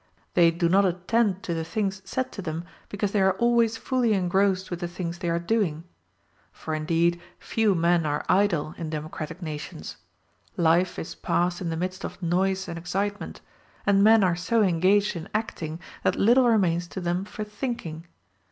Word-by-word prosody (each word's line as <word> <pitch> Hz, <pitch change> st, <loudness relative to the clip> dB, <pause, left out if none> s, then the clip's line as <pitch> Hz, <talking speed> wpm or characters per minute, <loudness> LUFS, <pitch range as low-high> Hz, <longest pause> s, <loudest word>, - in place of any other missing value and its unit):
They 170 Hz, -2 st, +6 dB
do 170 Hz, +1 st, 0 dB
not 195 Hz, +4 st, +4 dB
attend 190 Hz, +2 st, +1 dB
to 170 Hz, -, -2 dB
the 165 Hz, -1 st, -2 dB
things 195 Hz, +2 st, -2 dB
said 260 Hz, +7 st, -2 dB
to 200 Hz, -, -6 dB
them, 165 Hz, -2 st, -4 dB, 0.3 s
because 205 Hz, -1 st, -2 dB
they 205 Hz, -, +2 dB
are 190 Hz, 0 st, +4 dB
always 235 Hz, -1 st, +2 dB
fully 245 Hz, -2 st, +1 dB
engrossed 190 Hz, 0 st, +1 dB
with 175 Hz, -, -3 dB
the 175 Hz, -, -3 dB
things 170 Hz, 0 st, -5 dB
they 175 Hz, -2 st, -2 dB
are 170 Hz, -, +1 dB
doing. 170 Hz, -3 st, 0 dB, 0.7 s
For 160 Hz, -, -6 dB
indeed 165 Hz, +2 st, +1 dB, 0.2 s
few 220 Hz, -4 st, +1 dB
men 170 Hz, 0 st, +3 dB
are 145 Hz, 0 st, -2 dB
idle 185 Hz, -6 st, +2 dB
in 165 Hz, -2 st, -4 dB
democratic 155 Hz, +3 st, -6 dB
nations; 150 Hz, -, -6 dB, 0.6 s
life 170 Hz, +2 st, +3 dB
is 165 Hz, -, -5 dB
passed 175 Hz, +1 st, -1 dB
in 175 Hz, -, -2 dB
the 165 Hz, -, -2 dB
midst 185 Hz, +2 st, -4 dB
of -, -, -6 dB
noise 190 Hz, +2 st, 0 dB
and 170 Hz, -, -5 dB
excitement, 195 Hz, +4 st, -3 dB, 0.4 s
and 200 Hz, -1 st, +4 dB
men 220 Hz, 0 st, +6 dB
are 180 Hz, -2 st, +3 dB
so 220 Hz, +6 st, +1 dB
engaged 190 Hz, +3 st, +3 dB
in 170 Hz, +3 st, -6 dB
acting 165 Hz, -7 st, -3 dB, 0.2 s
that -, -, +1 dB
little 245 Hz, +4 st, +4 dB
remains 175 Hz, -6 st, +2 dB
to 190 Hz, -, -6 dB
them 175 Hz, +1 st, -1 dB
for 215 Hz, +1 st, -6 dB
thinking. 210 Hz, -7 st, -5 dB
180 Hz, 180 wpm, -26 LUFS, 170-205 Hz, 0.7 s, They